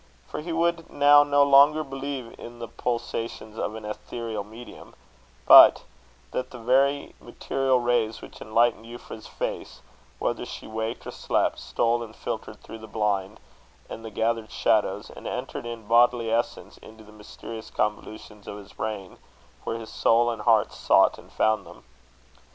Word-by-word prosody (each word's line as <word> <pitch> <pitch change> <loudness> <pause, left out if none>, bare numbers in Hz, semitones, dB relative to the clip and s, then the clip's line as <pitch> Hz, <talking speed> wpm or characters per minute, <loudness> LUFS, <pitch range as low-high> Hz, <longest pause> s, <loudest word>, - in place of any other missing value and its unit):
For - - -6
he 170 +2 -6
would 170 0 0
now 145 0 +6
no 145 0 +3
longer 140 +2 +6
believe 135 -3 -6
in 120 0 -10
the 115 0 -7
pulsations 115 -2 -4
of 105 - -3
an 110 -1 -8
ethereal 110 0 -5
medium; 110 +4 -13 0.5
but - - +9 0.5
that 125 - -3
the 125 - -10
very 135 +4 +1
material 135 -1 -1
rays 120 -2 0
which - - -13
enlightened 115 +1 +1
Euphra's 115 -2 -10
face, - - -5 0.4
whether - - -2
she - - -8
waked 110 +1 -5
or - - -6
slept, - - -1
stole 120 +1 0
and 110 -2 -9
filtered - - -6
through 115 - -10
the 110 - -11
blind 105 -1 -2 0.5
and 115 - -7
the 110 - -6
gathered 110 +1 -1
shadows, - - 0
and - - -9
entered 120 - -5
in 115 -3 -8
bodily 120 0 +3
essence 115 +1 -2
into 110 0 -14
the 105 - -16
mysterious 110 +1 -10
convolutions 105 0 -4
of 105 - -6
his 100 -2 -13
brain, 105 -3 -5 0.5
where 115 - -2
his 115 -1 -9
soul 120 +1 +3
and 115 -2 -6
heart 110 -1 +3
sought - - +3
and - - -17
found 110 -1 +1
them. - - -15
115 Hz, 160 wpm, -25 LUFS, 110-125 Hz, 0.5 s, but